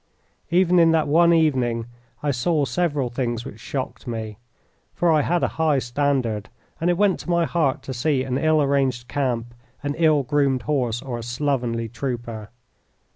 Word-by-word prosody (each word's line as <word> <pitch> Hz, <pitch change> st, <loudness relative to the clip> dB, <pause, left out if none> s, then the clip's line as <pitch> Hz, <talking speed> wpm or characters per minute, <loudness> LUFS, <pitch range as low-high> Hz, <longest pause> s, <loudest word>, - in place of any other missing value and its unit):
Even 180 Hz, 0 st, +4 dB
in 165 Hz, -1 st, +6 dB
that 160 Hz, -2 st, +2 dB
one 170 Hz, +3 st, +5 dB
evening 130 Hz, -8 st, +2 dB, 0.4 s
I 145 Hz, -, +1 dB
saw 145 Hz, +4 st, +1 dB
several 145 Hz, -6 st, -1 dB
things 120 Hz, -2 st, -2 dB
which 105 Hz, -, -9 dB
shocked 130 Hz, +2 st, -5 dB
me, 110 Hz, -3 st, -5 dB, 0.6 s
for 175 Hz, -1 st, +2 dB
I 155 Hz, -1 st, +4 dB
had 175 Hz, +4 st, 0 dB
a -, -, +3 dB
high 155 Hz, -3 st, +3 dB
standard, 120 Hz, -4 st, -1 dB, 0.3 s
and 170 Hz, -, +1 dB
it 175 Hz, -, +2 dB
went 200 Hz, -1 st, +2 dB
to -, -, -9 dB
my 170 Hz, -1 st, +2 dB
heart 150 Hz, -4 st, 0 dB
to 130 Hz, -, -5 dB
see 130 Hz, +1 st, 0 dB
an 130 Hz, 0 st, -2 dB
ill 155 Hz, -1 st, +3 dB
arranged 135 Hz, -3 st, 0 dB
camp, 120 Hz, -3 st, -2 dB, 0.3 s
an 145 Hz, 0 st, -1 dB
ill 155 Hz, -4 st, +4 dB
groomed 135 Hz, -1 st, +1 dB
horse, 125 Hz, -5 st, -1 dB
or 125 Hz, -3 st, -4 dB
a -, -, -7 dB
slovenly 120 Hz, -2 st, -1 dB
trooper. 120 Hz, -3 st, -5 dB
135 Hz, 175 wpm, -23 LUFS, 120-155 Hz, 0.6 s, in